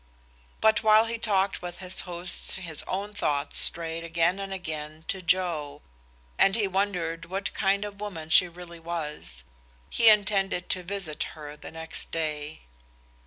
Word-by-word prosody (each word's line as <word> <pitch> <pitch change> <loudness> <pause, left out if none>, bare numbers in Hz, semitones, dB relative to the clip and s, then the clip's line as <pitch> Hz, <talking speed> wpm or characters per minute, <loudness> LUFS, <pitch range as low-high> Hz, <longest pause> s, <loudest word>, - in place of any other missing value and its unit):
But 220 -1 +4
while 220 0 +6
he 230 0 -3
talked 195 -3 +1
with 175 -1 -6
his 185 -1 +1
hosts 175 +1 0
his 170 -6 -1
own 200 +2 -3
thoughts 145 -8 0
strayed 165 0 +1
again 165 +3 +1
and 195 0 -5
again 155 -4 -6
to 190 - -2
Joe, 170 -5 0 0.6
and 195 - +5
he 215 -3 +2
wondered 180 -4 -1
what 195 +2 -3
kind 200 +1 +1
of 205 0 -9
woman 165 -7 -6
she 180 - +7
really 170 0 -11
was. 150 - -5 0.5
He 230 - +7
intended 195 -3 +3
to 185 - +1
visit 180 -4 -5 0.2
her 150 -1 -8
the - - -10
next 160 0 -4
day. 155 -1 -3
180 Hz, 155 wpm, -27 LUFS, 160-195 Hz, 0.6 s, she